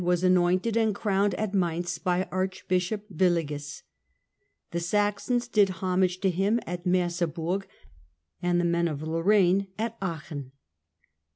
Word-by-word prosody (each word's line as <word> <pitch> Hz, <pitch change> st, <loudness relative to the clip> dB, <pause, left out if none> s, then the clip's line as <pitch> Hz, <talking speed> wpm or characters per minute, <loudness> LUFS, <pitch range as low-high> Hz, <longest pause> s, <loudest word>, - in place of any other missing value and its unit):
was 180 Hz, 0 st, +1 dB
anointed 185 Hz, +4 st, +3 dB
and 220 Hz, -3 st, +2 dB
crowned 200 Hz, -2 st, +1 dB
at 215 Hz, -2 st, -2 dB
Mainz 175 Hz, -2 st, -1 dB
by 180 Hz, -1 st, +1 dB
Archbishop 185 Hz, +2 st, -1 dB
Willigis; 150 Hz, -5 st, 0 dB, 0.9 s
the 170 Hz, -, -1 dB
Saxons 210 Hz, +7 st, 0 dB
did 205 Hz, -4 st, +4 dB
homage 185 Hz, 0 st, 0 dB
to 190 Hz, -2 st, +2 dB
him 195 Hz, +6 st, +1 dB
at 175 Hz, +1 st, -5 dB
Merseburg, 175 Hz, +1 st, 0 dB, 0.7 s
and 175 Hz, 0 st, +2 dB
the 175 Hz, -, +1 dB
men 170 Hz, 0 st, +2 dB
of 150 Hz, -2 st, -4 dB
Lorraine 185 Hz, +4 st, +3 dB
at 230 Hz, +1 st, -3 dB
Aachen. 155 Hz, -7 st, -5 dB
180 Hz, 125 wpm, -27 LUFS, 170-200 Hz, 0.9 s, did